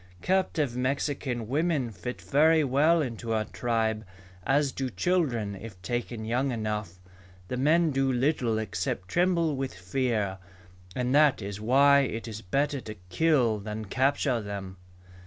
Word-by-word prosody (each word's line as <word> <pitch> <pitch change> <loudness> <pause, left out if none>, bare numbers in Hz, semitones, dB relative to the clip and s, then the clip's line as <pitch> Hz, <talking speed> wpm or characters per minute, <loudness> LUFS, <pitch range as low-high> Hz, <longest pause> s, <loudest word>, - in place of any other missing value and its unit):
Captive 165 -9 +1
Mexican 130 -2 -2
women 145 -2 0
fit 105 +5 -6
very 155 +2 +4
well 150 +5 +3
into 115 -3 -4
our 110 -1 0
tribe, 110 -2 -1 0.4
as 140 0 +2
do 130 -1 -3
children 125 - 0
if 100 -1 -10
taken 120 0 -3
young 125 +4 0
enough. 105 -5 -3 0.5
The 125 - -2
men 155 +4 +3
do 135 -1 +1
little 125 -3 +1
except 90 -3 -3
tremble 170 -3 +2
with 135 -6 -4
fear, 100 0 -1 0.6
and 125 0 0
that 150 -1 +5
is 100 +1 -6
why 140 +5 +5
it 120 -4 -2
is 110 -1 -6
better 140 +7 -1
to 110 -2 -8
kill 125 - +2
than 105 +1 -5
capture 130 +2 +1
them." 100 -2 -6
125 Hz, 140 wpm, -28 LUFS, 110-145 Hz, 0.6 s, that